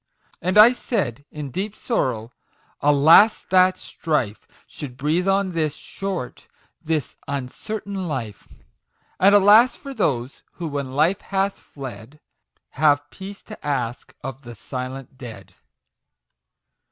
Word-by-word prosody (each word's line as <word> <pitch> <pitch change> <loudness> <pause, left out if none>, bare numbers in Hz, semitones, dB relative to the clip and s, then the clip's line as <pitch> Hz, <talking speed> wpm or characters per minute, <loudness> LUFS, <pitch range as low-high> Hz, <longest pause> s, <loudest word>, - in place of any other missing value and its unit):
And 185 +4 0
I 215 +3 +10
said, 145 - -2
in 150 -3 -7
deep 200 - -3
sorrow, 125 - -2 0.3
" - - -37
Alas 160 +10 +6
that 185 0 +5
strife 130 - -2 0.2
Should 130 -5 -9
breathe 160 +7 0
on 195 -1 +2
this 155 -3 -1
short 195 -10 -6 0.3
this 155 -4 -2
uncertain 190 +8 -4
life! 115 -9 -5 0.7
And, 200 +2 +6
alas 210 +5 +7
for 275 -1 -8
those 135 - -1
who, 170 - -5
when 140 -2 -4
Life 165 +7 +2
hath 195 0 -1
fled, 130 0 -10 0.5
Have 145 0 +2
Peace 195 +1 -9
to 215 - -11
ask 130 -2 -3
of 135 0 -6
the 120 -3 -10
silent 130 +3 -7
Dead 120 -4 -10
150 Hz, 125 wpm, -23 LUFS, 130-195 Hz, 0.7 s, I